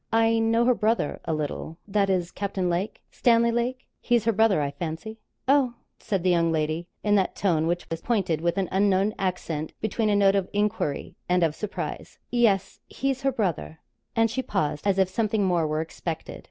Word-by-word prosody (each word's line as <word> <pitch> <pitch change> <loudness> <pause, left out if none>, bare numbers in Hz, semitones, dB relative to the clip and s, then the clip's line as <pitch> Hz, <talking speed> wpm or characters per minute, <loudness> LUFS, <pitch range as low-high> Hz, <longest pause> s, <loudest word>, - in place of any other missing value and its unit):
'I 225 0 +3
know 225 +1 +3
her 250 - +5
brother, 225 -7 0
a 165 - -1
little 155 +2 -4
that 200 -1 +1
is, 180 -2 0
Captain 190 -3 -2
Lake 180 +5 -3
Stanley 235 -1 +3
Lake; 245 +2 -2
he's 240 -3 +1
her 230 - +4
brother, 220 -4 +3
I 140 -1 -1
fancy?' 170 +9 -6 0.3
'Oh?' 265 -3 +3 0.2
said 195 -4 -2
the 185 - +3
young 170 -1 +3
lady, 160 +2 -1 0.2
in 205 - +2
that 190 - 0
tone 165 -5 +1
which 175 +1 -1
is 165 - -3
pointed 190 -9 0
with 170 +2 0
an 195 -2 +1
unknown 195 +1 +2
accent, 170 -5 -2
between 220 +1 0
a 205 - +3
note 200 -1 +5
of 195 -2 0
enquiry 205 -8 -1
and 180 -1 +3
of 160 -2 +2
surprise. 210 +5 -5
'Yes; 210 -6 +2
he's 270 0 -2
her 270 0 +2
brother.' 190 -9 -2 0.4
And 225 -1 +3
she 260 - -1
paused; 155 - -2
as 195 -1 +2
if 190 -1 +4
something 215 +1 0
more 175 -4 +2
were 155 +1 -1
expected. 165 0 -5
195 Hz, 195 wpm, -26 LUFS, 170-225 Hz, 0.4 s, her